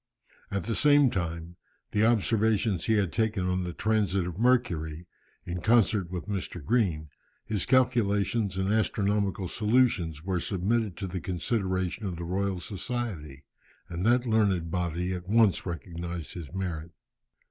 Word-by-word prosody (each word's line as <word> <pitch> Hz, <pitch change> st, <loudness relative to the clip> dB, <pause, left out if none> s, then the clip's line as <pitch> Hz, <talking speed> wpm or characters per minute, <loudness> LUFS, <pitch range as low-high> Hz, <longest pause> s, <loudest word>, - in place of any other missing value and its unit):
At 100 Hz, -2 st, -2 dB
the 115 Hz, -, -2 dB
same 145 Hz, +1 st, +5 dB
time, 85 Hz, -1 st, -4 dB, 0.3 s
the 105 Hz, -, +2 dB
observations 110 Hz, -4 st, +2 dB
he 110 Hz, -, +2 dB
had 100 Hz, -4 st, +1 dB
taken 110 Hz, -4 st, 0 dB
on 90 Hz, 0 st, 0 dB
the 90 Hz, -, -4 dB
transit 100 Hz, -2 st, +1 dB
of 90 Hz, +2 st, -6 dB
Mercury 90 Hz, -10 st, +1 dB, 0.4 s
in 90 Hz, 0 st, -4 dB
concert 110 Hz, -4 st, +3 dB
with 90 Hz, -1 st, -5 dB
Mr. 90 Hz, -6 st, -4 dB
Green, 85 Hz, -, +1 dB, 0.4 s
his 105 Hz, -4 st, -1 dB
calculations 115 Hz, -5 st, +2 dB
and 95 Hz, +2 st, +1 dB
astronomical 100 Hz, -3 st, 0 dB
solutions, 105 Hz, -8 st, +1 dB
were 95 Hz, -1 st, -1 dB
submitted 100 Hz, +3 st, -1 dB
to 100 Hz, -, -4 dB
the 90 Hz, -1 st, -4 dB
consideration 95 Hz, +1 st, -2 dB
of 90 Hz, -, -4 dB
the 85 Hz, -, -6 dB
Royal 95 Hz, +2 st, -1 dB
Society, 95 Hz, -, -5 dB, 0.4 s
and 90 Hz, +1 st, -4 dB
that 120 Hz, +3 st, +3 dB
learned 100 Hz, -7 st, +1 dB
body 90 Hz, +1 st, -1 dB
at 90 Hz, 0 st, -6 dB
once 110 Hz, -4 st, +3 dB
recognized 85 Hz, -1 st, -5 dB
his 85 Hz, -6 st, -8 dB
merit. 85 Hz, -4 st, -4 dB
95 Hz, 145 wpm, -28 LUFS, 85-110 Hz, 0.4 s, same